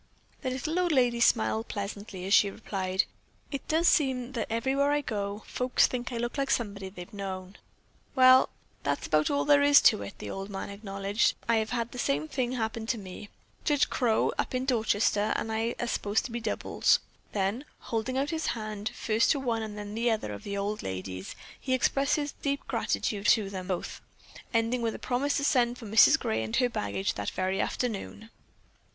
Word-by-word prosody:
The 260 - -1
little 305 +7 -2
old 355 -1 +2
lady 245 -4 +3
smiled 225 -1 +2
pleasantly 200 -2 -5
as 195 - 0
she 205 - +6
replied: 190 -2 -1 0.5
"It 275 - -5
does 325 +2 +2
seem 260 -4 +2
that 235 -5 -3
everywhere 270 +5 +1
I 295 0 +2
go, 205 -4 -4
folks 250 0 +2
think 245 0 -3
I 240 - -3
look 240 +4 -3
like 275 0 0
somebody 200 -6 -1
they've 180 -1 -10
known." 190 -1 -6 0.6
"Well, 255 0 +7 0.3
that's 140 0 -1
about 155 0 +2
all 285 0 +1
there 285 -1 +5
is 285 0 +7
to - - +5
it," 100 - -8
the - - -7
old 195 +1 -5
man 195 0 -5
acknowledged. 200 +1 0
"I 230 -1 +3
have 220 0 0
had 235 -1 -2
the 250 - -7
same 145 -5 0
thing 250 - -2
happen 225 -2 -3
to 235 - 0
me. 195 0 -9 0.3
Judge 295 -2 +2
Crow, 235 -4 +2
up - - -1
in 255 +1 -1
Dorchester, 220 -4 +2
and 220 - -2
I 225 +2 -1
are - - -1
supposed 210 -2 0
to 250 - -6
be 235 - -3
doubles." 235 - +2 0.4
Then, 205 +6 -1 0.2
holding 230 +3 -2
out 280 +3 0
his 320 -1 -2
hand, 215 -1 -4
first 220 +1 +1
to 285 - -2
one 235 -4 -1
and 215 -1 -6
then 205 0 -6
another 225 - 0
of 100 - -7
the 200 0 -4
old 205 +2 -2
ladies, 95 0 -5 0.2
he 260 -1 0
expressed 275 +3 +2
his 290 -1 -2
deep 280 0 -1
gratitude 205 -1 -1
to 210 -4 +4
them 185 -2 -6
both, 185 -3 -4 0.5
ending 230 +1 +1
with 225 -1 -1
a - - -5
promise 265 +3 0
to 280 - -1
send 245 -3 +2
for 230 - -10
Mrs. 220 +1 +6
Gray 110 0 -1
and 110 0 -3
her 250 - +3
baggage 100 - -2
that 100 - -3
very 185 +1 -1
afternoon. 225 -1 -3
225 Hz, 195 wpm, -29 LUFS, 200-255 Hz, 0.6 s, Well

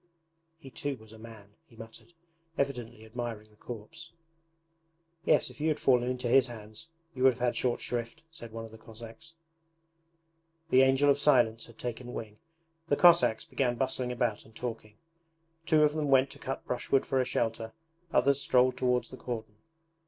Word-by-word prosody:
'He 140 -5 -13
too 140 +1 -4
was 110 -1 -16
a 110 - -13
man!' 110 -3 -13
he 115 - -20
muttered, 115 +9 -13 0.4
evidently 120 -5 -3
admiring 110 -2 -6
the - - -23
corpse. 120 +10 -10 1.1
'Yes, 155 - +3
if - - -13
you 155 - +1
had 155 - 0
fallen 125 -2 +3
into 125 -1 -2
his 130 +2 +5
hands 110 +3 -9 0.3
you 130 - -7
would 130 0 +6
have 125 - -15
had 125 0 0
short 125 -2 0
shrift,' 120 +4 -4
said 120 -8 -10
one 115 0 -6
of 110 - -12
the 110 - -13
Cossacks. 115 +8 -12 1.4
The 130 - +6
Angel 135 +2 +4
of 140 - +1
Silence 120 -6 +3
had 115 - -17
taken 125 0 -6
wing. 105 -1 -7 0.5
The 145 - +1
Cossacks 170 -10 +5
began 125 -3 -1
bustling 130 -1 -1
about 120 -3 -1
and 110 - -20
talking. 115 -3 -6 0.7
Two 155 -1 +5
of 150 -1 +3
them 155 -1 -1
went 135 0 +4
to - - -12
cut 135 - -5
brushwood 130 +2 0
for 135 -1 +1
a - - +2
shelter, 115 -2 -2 0.4
others 140 +2 +3
strolled 130 -1 +3
towards 125 -1 0
the 130 - -9
cordon. 110 -4 -6
125 Hz, 175 wpm, -30 LUFS, 115-135 Hz, 1.4 s, would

